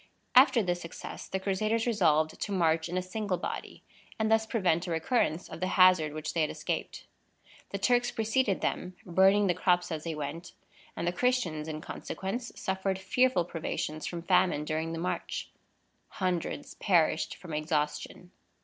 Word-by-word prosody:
After 250 -2 +6
this 175 -1 -1
success 170 - -8
the 190 - -2
Crusaders 215 +4 0
resolved 160 -9 +2
to 205 - -2
march 165 -3 +2
in 180 - -2
a 185 - 0
single 195 0 -2
body, - - -6 0.3
and 220 0 0
thus 220 0 +3
prevent 180 -6 +1
a - - -4
recurrence 165 0 0
of - - -8
the 185 - 0
hazard 185 -5 +6
which 155 0 -4
they 165 - +1
had 155 - +1
escaped. - - -4 0.6
The - - -3
Turks 245 -1 +2
preceded 225 -2 0
them, 180 0 -2
burning 190 +3 +4
the 180 - +3
crops 180 0 +1
as 155 -1 -3
they 165 -2 -3
went, 150 +4 -6 0.4
and 170 - -3
the - - +3
Christians, 180 -9 0
in 155 -1 -5
consequence, 230 +9 -5
suffered 190 0 -1
fearful 190 0 +2
privations 155 -2 -4
from 170 -1 -5
famine 180 -4 +2
during 160 +1 -2
the - - -4
march. 180 +2 -3 0.6
Hundreds 180 -3 -3
perished 170 -4 +2
from 170 -4 -9
exhaustion. 150 +2 -2
180 Hz, 165 wpm, -30 LUFS, 160-200 Hz, 0.6 s, After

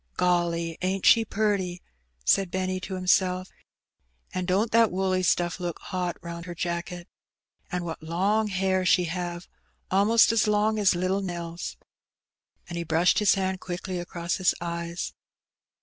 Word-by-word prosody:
'^ - - -33
Golly, 170 -2 +1
ain't 185 +1 -1
she 225 - +7
purty!" 200 -5 -1 0.4
said 195 -2 +3
Benny 185 0 -2
to 185 +1 -5
himself 185 0 +2
;•'' - - -30 0.8
and 185 -1 -2
don*t 200 +5 +2
that 230 -1 +5
woolly 185 0 0
stuff 175 0 +1
look 175 -2 -3
hot 180 -2 -3
round 170 0 -7
her 175 - -6
jafcket! 175 +1 -4 0.7
And 180 -1 -2
what 165 -2 -5
long 195 +7 +1
hair 190 -1 0
she 185 0 +4
have! 175 0 -4 0.2
— - - -42
a'most 210 +5 +5
as 225 -1 +2
long 210 +1 +2
as 195 -3 +4
little 185 +3 0
Nell's," 170 -2 -5 0.9
and 175 -1 -5
he - - -2
brushed 165 +2 +3
his 210 -1 +4
hand 190 -1 -1
quickly 180 0 -5
across 175 -1 -3
his 185 -2 +2
eyes. 170 0 -4
180 Hz, 160 wpm, -26 LUFS, 175-190 Hz, 0.9 s, she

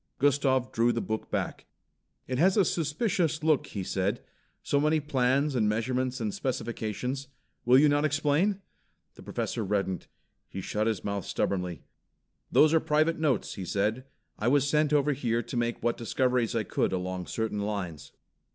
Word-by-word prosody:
Gustav 135 -2 +2
drew 115 +1 +3
the 120 - -1
book 110 -1 -4
back. - - -3 0.6
"It 130 0 -3
has 185 +5 +4
a 200 - +5
suspicious 165 -1 0
look," 155 -3 +2
he 100 - -5
said. - - -1 0.4
"So 140 - +1
many 155 +2 +3
plans 140 0 +1
and 110 -4 +2
measurements 125 +4 -1
and 110 -3 -2
specifications. 125 +1 -3 0.4
Will 125 +2 +6
you 150 +3 +6
not 145 0 +2
explain?" 155 +7 +1 0.5
The - - -14
Professor 115 - -3
reddened. 95 -3 -1 0.4
He - - -6
shut 105 +3 -1
his 110 -4 -1
mouth 100 -2 -3
stubbornly. 90 -3 -2 0.7
"Those 155 +1 +5
are 160 - +5
private 155 +2 +1
notes," 145 -8 0
he 95 - -6
said. 105 +7 -1 0.3
"I 110 - 0
was 140 +2 +3
sent 150 0 +2
over 150 0 +3
here 120 -3 -1
to - - -7
make 120 0 -1
what 120 - +1
discoveries 125 0 0
I 115 - +1
could 95 - -1
along 90 -1 -3
certain 110 -2 -2
lines." 100 -8 -4
125 Hz, 165 wpm, -28 LUFS, 110-150 Hz, 0.7 s, Will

